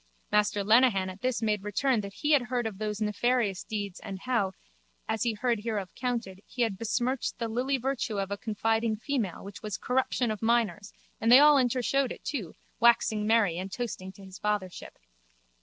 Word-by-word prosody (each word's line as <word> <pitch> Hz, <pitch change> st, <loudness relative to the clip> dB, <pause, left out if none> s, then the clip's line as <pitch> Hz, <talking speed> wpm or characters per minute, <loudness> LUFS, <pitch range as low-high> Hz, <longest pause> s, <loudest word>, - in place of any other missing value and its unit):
Master 210 Hz, -1 st, +2 dB
Lenehan 215 Hz, -3 st, +4 dB
at 185 Hz, +2 st, -13 dB
this 255 Hz, -2 st, -1 dB
made 210 Hz, -2 st, +1 dB
return 215 Hz, +4 st, +1 dB
that 200 Hz, -1 st, -8 dB
he 300 Hz, -, -1 dB
had 290 Hz, -3 st, +6 dB
heard 245 Hz, -1 st, -2 dB
of 210 Hz, -3 st, -5 dB
those 210 Hz, -1 st, -3 dB
nefarious 215 Hz, -2 st, 0 dB
deeds 205 Hz, -4 st, -5 dB
and 195 Hz, -, -6 dB
how, 230 Hz, -7 st, 0 dB, 0.5 s
as 220 Hz, -, -2 dB
he 235 Hz, -2 st, +1 dB
heard 235 Hz, +1 st, 0 dB
hereof 205 Hz, -4 st, -3 dB
counted, 235 Hz, -7 st, -3 dB
he 245 Hz, -, -1 dB
had 225 Hz, -4 st, 0 dB
besmirched 240 Hz, +5 st, -1 dB
the 230 Hz, -, -2 dB
lily 255 Hz, +5 st, 0 dB
virtue 250 Hz, -4 st, -2 dB
of 195 Hz, 0 st, -3 dB
a -, -, 0 dB
confiding 225 Hz, 0 st, 0 dB
female 225 Hz, -5 st, -3 dB
which 200 Hz, 0 st, -9 dB
was 210 Hz, -3 st, -4 dB
corruption 250 Hz, -2 st, 0 dB
of 215 Hz, -, -5 dB
minors 225 Hz, -3 st, +1 dB, 0.3 s
and 225 Hz, +1 st, +3 dB
they 250 Hz, -, +11 dB
all 295 Hz, +1 st, +7 dB
intershowed 255 Hz, +1 st, +1 dB
it -, -, -8 dB
too, 225 Hz, -, -4 dB, 0.2 s
waxing 220 Hz, -2 st, +3 dB
merry 210 Hz, -7 st, +3 dB
and 190 Hz, +1 st, -5 dB
toasting 200 Hz, -6 st, -5 dB
to 195 Hz, -, -13 dB
his 190 Hz, 0 st, -11 dB
fathership. 210 Hz, -4 st, -3 dB
220 Hz, 190 wpm, -28 LUFS, 200-245 Hz, 0.5 s, they